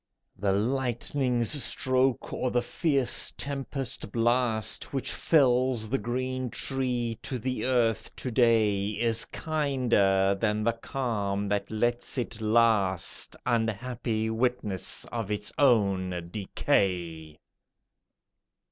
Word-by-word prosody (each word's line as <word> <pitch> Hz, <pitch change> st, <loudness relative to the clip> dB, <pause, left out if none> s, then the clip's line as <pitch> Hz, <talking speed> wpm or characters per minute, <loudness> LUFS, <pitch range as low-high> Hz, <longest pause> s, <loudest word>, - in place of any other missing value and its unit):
The 100 Hz, 0 st, 0 dB
lightning's 125 Hz, +2 st, 0 dB
stroke 130 Hz, 0 st, 0 dB
or 130 Hz, -, -1 dB
the 120 Hz, 0 st, +1 dB
fierce 135 Hz, 0 st, 0 dB
tempest 135 Hz, -5 st, -4 dB
blast 115 Hz, -1 st, 0 dB
Which 135 Hz, -, -2 dB
fells 125 Hz, -6 st, +2 dB
the 135 Hz, -, 0 dB
green 130 Hz, +3 st, -2 dB
tree 125 Hz, -3 st, -1 dB
to 130 Hz, -, -3 dB
the 125 Hz, +2 st, -2 dB
earth 120 Hz, -4 st, +1 dB
to 130 Hz, -, -4 dB
day 110 Hz, -5 st, +3 dB
Is 115 Hz, -1 st, +1 dB
kinder 120 Hz, -11 st, +1 dB
than 105 Hz, -1 st, +1 dB
the 115 Hz, +1 st, +2 dB
calm 105 Hz, -5 st, -2 dB
that 100 Hz, 0 st, -1 dB
lets 120 Hz, +4 st, -1 dB
it 115 Hz, -2 st, -3 dB
last, 110 Hz, -5 st, +2 dB
Unhappy 115 Hz, -1 st, -1 dB
witness 110 Hz, -5 st, -1 dB
of 115 Hz, -4 st, -3 dB
its 105 Hz, 0 st, -3 dB
own 95 Hz, -9 st, +2 dB
decay. 85 Hz, -6 st, -1 dB
115 Hz, 105 wpm, -28 LUFS, 105-130 Hz, -, day